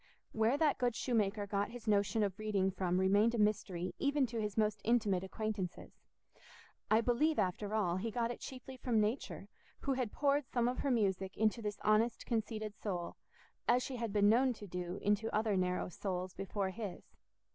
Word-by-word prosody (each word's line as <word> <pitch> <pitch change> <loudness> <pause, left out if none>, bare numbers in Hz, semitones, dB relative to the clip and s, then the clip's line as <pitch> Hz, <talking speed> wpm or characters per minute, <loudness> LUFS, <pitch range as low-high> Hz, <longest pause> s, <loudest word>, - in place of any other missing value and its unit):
Where 225 +5 +2
that 305 -2 +2
good 245 -2 +1
shoemaker 210 -4 0
got 200 0 -1
his 235 -1 -10
notion 210 +1 +2
of 200 -1 -2
reading 200 -3 +1
from 180 -1 0
remained 205 +5 +4
a - - -1
mystery 195 -4 0
even 285 -1 +2
to 230 -2 -3
his 210 -1 -3
most 210 -1 +1
intimate 210 -6 +2
acquaintances. 200 -2 -4 1.0
I 220 +1 +5
believe, 275 +7 +2
after 200 +3 -1
all, 180 -5 +1
he 220 +5 -2
got 230 +1 -1
it - - -7
chiefly 260 0 -8
from 245 -3 +1
Nature, 215 +5 -1 0.3
who 275 - 0
had 255 -5 -1
poured 280 -1 +1
some 240 -1 +1
of 250 - -1
her 280 - 0
music 195 -6 0
into 220 +2 +2
this 210 -1 -3
honest 215 +2 +2
conceited 220 -2 -2
soul, 180 -5 -4 0.5
as 250 +1 +4
she 260 - -4
had 230 -3 -2
been 205 0 +4
known 250 +4 +4
to 215 - -10
do 180 0 -4
into 210 +2 +2
other 215 -1 +2
narrow 180 -1 0
souls 185 0 -4
before 195 0 -2
his. 205 -2 -6
215 Hz, 185 wpm, -35 LUFS, 195-235 Hz, 1.0 s, I